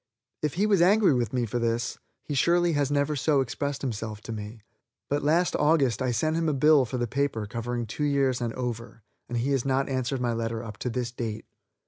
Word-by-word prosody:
If 150 -1 -1
he 200 +4 +2
was 200 -4 +3
angry 195 -1 +5
with 120 -4 0
me 125 -2 0
for 115 +2 -2
this, 115 +1 -1 0.2
he 150 - -5
surely 170 +5 +3
has 145 -2 +1
never 145 +1 +1
so 145 +1 +2
expressed 140 +3 -2
himself 110 -4 -4
to 115 - -8
me, 105 0 -7 0.5
but 145 +1 0
last 165 +4 +2
August 145 -5 +2
I 130 - +1
sent 155 +7 0
him 165 -1 +1
a - - +1
bill 150 0 +5
for 125 +2 -4
his 120 - 0
paper 120 -2 -1
covering 120 +2 -3
two 130 +7 -3
years 135 -3 +1
and 120 -1 -1
over, 115 -3 -5 0.3
and 120 - -2
he 125 +4 0
has 135 -3 +1
not 135 0 0
answered 130 0 -1
my 120 -1 0
letter 115 0 -3
up 105 -2 -8
to 125 - -2
this 125 0 -2
date. 115 -3 -5
130 Hz, 220 wpm, -27 LUFS, 115-145 Hz, 0.5 s, angry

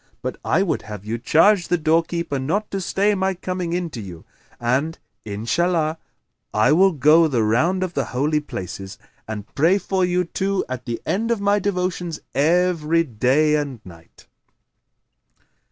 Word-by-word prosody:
But - - -3
I 190 - +2
would 190 - -1
have 105 -2 -9
you 115 +2 -3
charge 175 - +4
the 175 - +2
doorkeeper 165 -2 0
not 180 +11 -2
to 195 - -2
stay 200 +3 +1
my 190 -1 0
coming 180 -1 -4
in 175 -2 -2
to 115 - -6
you; 90 -5 -10 0.3
and, 130 +7 0 0.3
Inshallah! 155 - 0 0.6
I 110 +6 +4
will 190 +5 +5
go 155 +2 +5
the 125 -7 +1
round 160 - +2
of 180 -2 -4
the - - -1
Holy 150 +4 0
Places 95 -8 -7 0.3
and 105 -2 -5
pray 165 +7 +3
for 190 -1 -1
you 180 0 +1
two 195 +3 -2
at 125 -1 -6
the 120 -2 -3
end 225 +4 -1
of 235 -2 +1
my 200 +1 +2
devotions 180 -4 -2
every 165 +1 +2
day 135 +4 +2
and 145 -5 -1
night." 85 -2 -16
160 Hz, 160 wpm, -22 LUFS, 125-180 Hz, 0.6 s, will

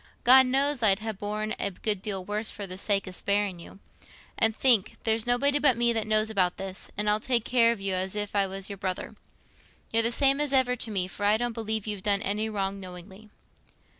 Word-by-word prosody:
God 260 +1 +7
knows 275 +1 +1
I'd 200 -3 +5
ha' 220 0 -5
borne 210 +2 -4
a 200 - -1
good 200 +1 -2
deal 195 -3 -4
worse 210 +2 -1
for 205 - -6
the 185 0 -8
sake 200 -1 0
o' - - -6
sparing 200 0 -1
it - - -10
you. - - -15 0.6
And 220 -1 +2
think—there's 225 -1 +2
nobody 280 +4 +2
but 265 -5 +3
me 235 0 +2
knows 215 -1 0
about 185 -4 0
this, 190 -1 -7
and 210 0 -1
I'll 210 +1 +3
take 235 0 0
care 235 -2 +4
of 235 - -4
you 195 -1 -2
as 185 +2 -2
if 205 0 -3
I 200 -1 +2
was 195 0 -5
your 200 - -7
brother. 185 -1 -4 0.8
You're 225 - +4
the 230 +1 0
same 275 +3 +3
as 290 -2 -1
ever 255 -2 +3
to 230 - -5
me, 190 -4 -1
for 205 - -7
I 205 +1 +4
don't 240 0 -2
believe 220 -2 -3
you've 210 -3 -4
done 200 0 0
any 210 +2 -1
wrong 200 -2 -3
knowingly." 190 +3 -11
210 Hz, 225 wpm, -27 LUFS, 195-235 Hz, 0.8 s, God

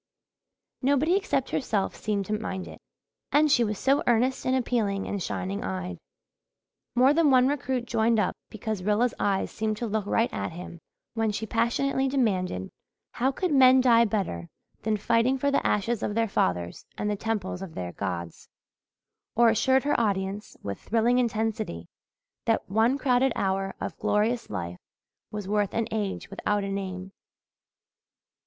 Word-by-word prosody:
Nobody 285 +6 +3
except 390 -9 0
herself 210 -7 -1
seemed 205 -2 -2
to 210 - -3
mind 190 -3 -3
it. - - -11 0.5
And 300 0 +4
she 240 - +5
was 210 -2 -2
so 275 +6 +2
earnest 250 +3 +2
and 260 - +3
appealing 225 -6 0
and 200 - -3
shining 195 +5 -3
eyed! 185 -4 -4 1.0
More 255 +3 +5
than 320 -1 +4
one 255 -1 +5
recruit 265 -3 -1
joined 230 -1 +2
up 195 - 0
because 215 -2 -4
Rilla's 210 +5 +2
eyes 195 -1 0
seemed 215 -1 -2
to 240 - -3
look 215 -2 -2
right 225 +3 +1
at - - -3
him 170 0 -8 0.3
when 225 -1 0
she 220 +2 -3
passionately 240 +5 +1
demanded 190 - 0 0.4
how 260 +3 +1
could 360 +5 -2
men 260 -1 +7
die 235 -2 +6
better 190 - -2 0.3
than 215 -1 0
fighting 230 +5 +2
for 280 +2 +1
the 280 - +2
ashes 220 +2 0
of 205 - -2
their 230 0 +2
fathers 90 - -1
and 210 - -2
the 210 - 0
temples 200 -4 -3
of 185 -4 -8
their 90 -1 -4
gods, 85 -1 -5 0.9
or 235 0 +6
assured 260 +4 +3
her 290 - +1
audience 200 -1 -2
with 100 -1 -4
thrilling 235 +3 +2
intensity 220 - -1 0.6
that - - +1
one 225 +6 +2
crowded 260 -1 +2
hour 195 0 -1
of - - -4
glorious 225 +3 +1
life 85 +1 -5 0.5
was 210 -2 -5
worth 205 -1 0
an 230 -1 0
age 210 -3 -3
without 205 +1 -1
a 195 - -3
name. 190 -1 -4
220 Hz, 160 wpm, -27 LUFS, 195-250 Hz, 1.0 s, men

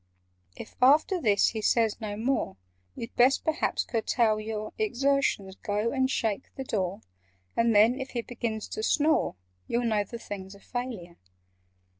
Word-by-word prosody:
"If - - -10
after 305 +8 +5
this 205 -5 +4
he 220 - -4
says 225 +1 +2
no 205 -1 -4
more, 230 - -1 0.4
You'd 230 +1 -7
best 255 +3 +4
perhaps 315 0 0
curtail 225 -2 +1
your 215 0 -5
Exertions—go 240 - 0
and 260 -1 +1
shake 225 -3 -1
the 270 - -4
door, 195 -6 -2 0.5
And 230 -1 +3
then, 225 +6 +5
if 265 0 -5
he 235 -2 -3
begins 225 -3 -4
to - - -4
snore, 310 - +2 0.3
You'll 240 +1 0
know 215 -3 +2
the 235 +4 -8
thing's 195 -3 -8
a - - -15
failure. 225 -8 -6
230 Hz, 150 wpm, -28 LUFS, 210-260 Hz, 0.5 s, after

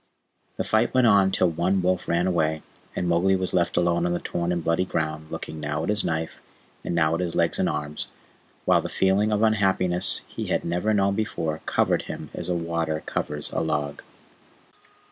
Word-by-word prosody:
The - - 0
fight 110 +3 +1
went 130 -1 +5
on 100 -4 +5
till 90 -2 +2
one 90 +4 +1
wolf 90 0 0
ran 85 +1 +1
away, 80 -4 0 0.3
and 90 - -1
Mowgli 90 +3 +3
was 95 -1 -2
left 85 -1 +1
alone 85 0 +2
on 85 - 0
the 85 - -1
torn 85 0 -2
and 85 -2 -1
bloody 85 +2 +2
ground, 80 -3 -3
looking 80 0 -6
now 75 +1 -2
at - - -2
his 105 0 +1
knife, 80 0 -2 0.4
and - - -2
now 80 -1 +3
at 85 - 0
his 90 -2 -2
legs 85 -1 +1
and - - +2
arms, 75 0 -3 0.6
while - - +4
the - - -5
feeling 100 +3 +2
of 105 +1 +1
unhappiness 95 -5 +2
he - - -6
had - - 0
never 90 +5 0
known 100 -2 +2
before 80 -7 -2
covered - - +2
him - - -7
as - - -2
water 85 -2 -1
covers 75 0 -3
a - - 0
log. 75 -2 -2
85 Hz, 195 wpm, -25 LUFS, 80-95 Hz, 0.6 s, went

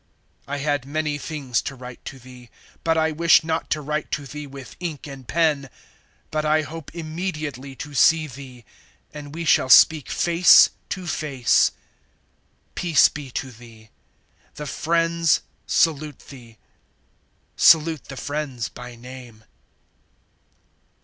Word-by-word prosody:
(13)I 145 +1 -4
had 145 -2 -1
many 150 0 -2
things 140 -6 -2
to 135 - -6
write 125 -1 -11
to 135 - -7
thee, 125 -1 -14 0.3
but 165 0 +1
I 160 0 +2
wish 165 +1 +4
not 160 0 -2
to 155 - -1
write 150 +1 -3
to 145 - -2
thee 150 +1 -8
with 135 -1 -11
ink 165 -5 -5
and 135 -4 -10
pen; 155 -5 +1 0.6
(14)but 155 0 -1
I 155 0 +2
hope 155 +1 -9
immediately 155 -5 -5
to 145 +2 -8
see 160 +3 +4
thee, 130 -4 -11 0.5
and 150 0 -9
we 165 0 -4
shall 130 - +3
speak 155 +2 +6
face 175 +1 +6 0.2
to 185 - -5
face. 145 -7 +2 1.0
Peace 170 -4 +4
be 145 -3 -8
to 130 +1 -5
thee. 110 -2 -16 0.6
The 150 - -6
friends 165 +1 +1 0.3
salute 155 -3 0
thee. 120 -5 -13 1.0
Salute 160 -2 +4
the 135 - -9
friends, 145 -5 -4
by 125 -1 -10
name. 120 -2 -12
145 Hz, 135 wpm, -23 LUFS, 130-160 Hz, 1.0 s, speak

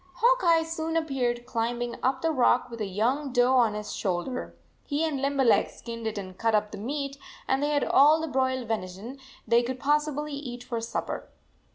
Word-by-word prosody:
Hawk - - +3
Eye 335 -2 +5
soon 325 0 -2
appeared 250 -6 -1
climb 235 0 -2
ing 240 0 -3
up 260 +1 0
the 325 - +2
rock 250 -3 +2
with 230 -1 -7
a 210 - -1
young 250 +9 0
doe 245 +1 +3
on 235 -5 +4
his 210 0 -5
shoulder. 195 +7 -3 0.3
He 295 +2 -1
and 290 -4 -2
Limberleg 275 -3 +3
skinned 230 -1 -7
it 215 -1 -3
and 185 -2 -7
cut 225 -1 +2
up 210 0 0
the - - -7
meat, 275 +4 -4 0.3
and 265 +1 +1
they 290 - +1
had 290 -1 +1
all 300 +4 +5
the 320 - -3
broiled 260 -3 0
venison 215 +4 -4 0.3
they 235 +1 +5
could 255 +1 -4
possibly 295 +1 0
eat 250 -4 -6
for 235 -2 -4
supper. 230 - -4
255 Hz, 200 wpm, -27 LUFS, 230-290 Hz, 0.3 s, Eye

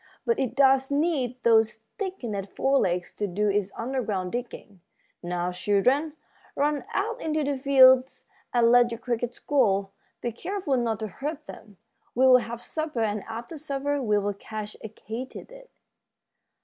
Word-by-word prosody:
But 465 -1 +1
it 255 -2 -1
does 270 -1 +4
need 285 -4 0
those 225 -1 +4 0.3
thickened 235 - -4
fore 275 0 +3
legs 175 0 -1
to 205 - -1
do 205 +3 0
its 200 -1 0
underground 225 -7 -2
digging. 230 -6 -7 0.4
Now, 175 0 -2
children, 230 - +1 0.4
run 290 +2 0
out 465 +2 -1
into 310 -1 0
the 285 0 0
fields 260 -1 +5 0.3
and 235 -1 +4
let 245 0 +6
your 230 - -5
crickets 240 0 -3
go. 200 -9 +1 0.3
Be 240 - -2
careful 365 - -2
not 230 -3 -1
to 215 - -2
hurt 295 - -6
them. 205 -4 -12 0.4
We'll 255 +1 +7
have 235 -1 -5
supper, 310 -6 -3
and 210 -2 0
after 235 +8 -7
supper 285 -1 -2
we'll 205 -3 +1
catch 215 +1 -7
a 220 - -6
katydid." 260 - -9
245 Hz, 150 wpm, -26 LUFS, 210-280 Hz, 0.4 s, We'll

